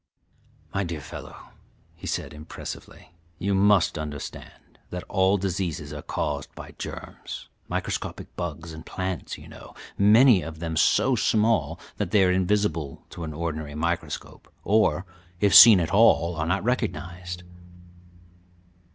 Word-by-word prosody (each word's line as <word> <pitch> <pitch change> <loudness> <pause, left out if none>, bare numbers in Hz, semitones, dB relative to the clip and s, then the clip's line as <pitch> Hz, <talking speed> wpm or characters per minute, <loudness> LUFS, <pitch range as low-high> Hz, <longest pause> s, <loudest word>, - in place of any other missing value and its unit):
] - - -33
"My 100 - 0
dear 85 -3 -4
fellow," 70 - -10 0.5
he - - -9
said - - -3
impressively, 75 +3 -9 0.3
"you 100 +2 -1
must 95 -4 +3
understand 75 -2 -8
that 90 0 -5
all 95 0 +2
diseases 90 -6 -3
are 75 - -6
caused - - -3
by - - -9
germs - - -8 0.2
microscopic - - -4
bugs 80 -2 -5
and 80 0 -9
plants, 95 0 -4
you - - -13
know, - - -13 0.2
many 110 +1 +6
of 80 0 -7
them 80 0 -4
so - - +3
small 110 -9 +1 0.2
that 100 - -2
they 100 0 +4
are 90 - +4
invisible 90 -6 0
to 85 - -7
an 80 -1 -5
ordinary 80 -2 -4
microscope, 85 +2 -4
or, 105 -3 +2 0.3
if 100 0 +3
seen 110 -5 +11
at 85 +1 -2
all, 90 -6 +5
are 80 +1 -2
not 95 +3 0
recognized. 90 -7 -3
90 Hz, 140 wpm, -25 LUFS, 80-100 Hz, 0.5 s, seen